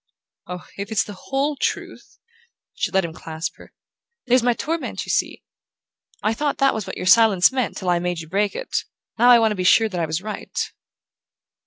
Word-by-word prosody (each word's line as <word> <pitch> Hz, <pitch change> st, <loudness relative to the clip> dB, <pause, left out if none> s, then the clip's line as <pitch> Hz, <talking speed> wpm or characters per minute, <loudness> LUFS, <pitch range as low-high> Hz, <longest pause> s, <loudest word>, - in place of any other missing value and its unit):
"Oh, 180 Hz, 0 st, -7 dB
if 200 Hz, +3 st, -5 dB
it's 220 Hz, -, +2 dB
the 205 Hz, -, -9 dB
WHOLE 275 Hz, +8 st, -2 dB
truth! -, -, -4 dB, 0.3 s
" -, -, -49 dB
She -, -, -2 dB
let 190 Hz, -2 st, +1 dB
him 165 Hz, -, -6 dB
clasp 160 Hz, +1 st, -6 dB
her. -, -, -15 dB, 0.5 s
"There's 250 Hz, 0 st, +4 dB
my 245 Hz, +1 st, +3 dB
torment, 325 Hz, +7 st, -3 dB
you -, -, -3 dB
see. -, -, -1 dB, 0.8 s
I 215 Hz, -, +2 dB
thought 290 Hz, +5 st, -1 dB
that 275 Hz, -1 st, +3 dB
was 215 Hz, -3 st, -4 dB
what -, -, -6 dB
your -, -, -4 dB
silence 200 Hz, -1 st, +6 dB
meant 255 Hz, -4 st, -2 dB
till 185 Hz, -, -3 dB
I 175 Hz, -, +2 dB
made 175 Hz, -1 st, -2 dB
you 160 Hz, -, -8 dB
break 200 Hz, +4 st, 0 dB
it. -, -, -3 dB, 0.3 s
Now 245 Hz, +1 st, +6 dB
I 245 Hz, -, +9 dB
want 225 Hz, -1 st, +3 dB
to -, -, -1 dB
be 185 Hz, -, -2 dB
sure 220 Hz, +4 st, +5 dB
that 180 Hz, -4 st, -3 dB
I 165 Hz, -, 0 dB
was 160 Hz, +1 st, -1 dB
right." 215 Hz, +2 st, -6 dB
210 Hz, 210 wpm, -22 LUFS, 180-245 Hz, 0.8 s, I